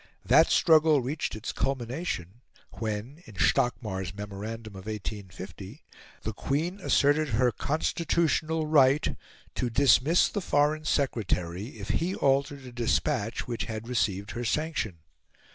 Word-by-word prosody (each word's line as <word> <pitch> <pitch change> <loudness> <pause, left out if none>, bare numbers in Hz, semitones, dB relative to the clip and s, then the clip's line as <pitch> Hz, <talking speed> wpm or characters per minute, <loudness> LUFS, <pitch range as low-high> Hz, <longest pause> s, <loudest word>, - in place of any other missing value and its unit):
That - - +6
struggle 155 -2 +5
reached 135 +2 -3
its 110 +2 -4
culmination 125 - -3 0.4
when, 110 +7 -4
in 110 - -12
Stockmar's 100 -3 0
memorandum 105 +2 -6
of 95 +1 -10
1850, 100 - -7 0.4
the 110 - -3
Queen 160 - -2
asserted 150 -4 +3
her 125 0 +2
"constitutional 160 - 0
right" 145 -2 +4 0.4
to 125 - -1
dismiss 140 +6 +4
the 205 - -3
Foreign 150 -1 +1
Secretary 105 - -1
if 100 -1 -7
he 180 +4 0
altered 140 0 +1
a 125 - -9
despatch 115 -2 -1
which 120 -2 -3
had 110 0 -6
received 105 -4 -1
her 120 - -4
sanction. 120 - -2
125 Hz, 125 wpm, -28 LUFS, 105-150 Hz, 0.4 s, That